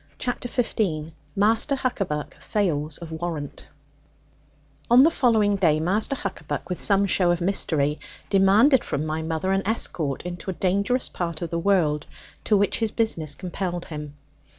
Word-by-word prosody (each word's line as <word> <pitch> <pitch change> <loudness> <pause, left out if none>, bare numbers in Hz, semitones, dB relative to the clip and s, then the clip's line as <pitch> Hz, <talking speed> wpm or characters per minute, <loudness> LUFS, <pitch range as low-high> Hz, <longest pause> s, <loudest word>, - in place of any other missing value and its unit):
CHAPTER 245 -1 -3
XV 180 -10 -1 0.2
MASTER 220 +7 +3
HUCKABACK 195 - -3
FAILS 155 -7 -1
OF 170 -2 -9
WARRANT 160 -3 -5 1.2
On 245 +3 +8
the 325 - +5
following 220 -8 +2
day 160 -5 +3
Master 200 - 0
Huckaback, 170 - -5
with 180 - -4
some 200 -1 +3
show 180 -2 +2
of 175 0 +2
mystery, 155 -5 +1 0.3
demanded 210 +8 +5
from 145 +2 -2
my 155 +1 -2
mother 160 +3 -2
an 195 0 +2
escort 165 - -1
into 180 +2 -6
a - - -1
dangerous 200 +8 0
part 170 -1 -4
of 170 - -5
the 170 - -1
world, 165 -5 +1 0.4
to 210 - +4
which 200 -1 +1
his 225 -1 +1
business 165 -10 -1
compelled 180 0 -4
him. 150 -2 -7
185 Hz, 150 wpm, -24 LUFS, 160-210 Hz, 1.2 s, On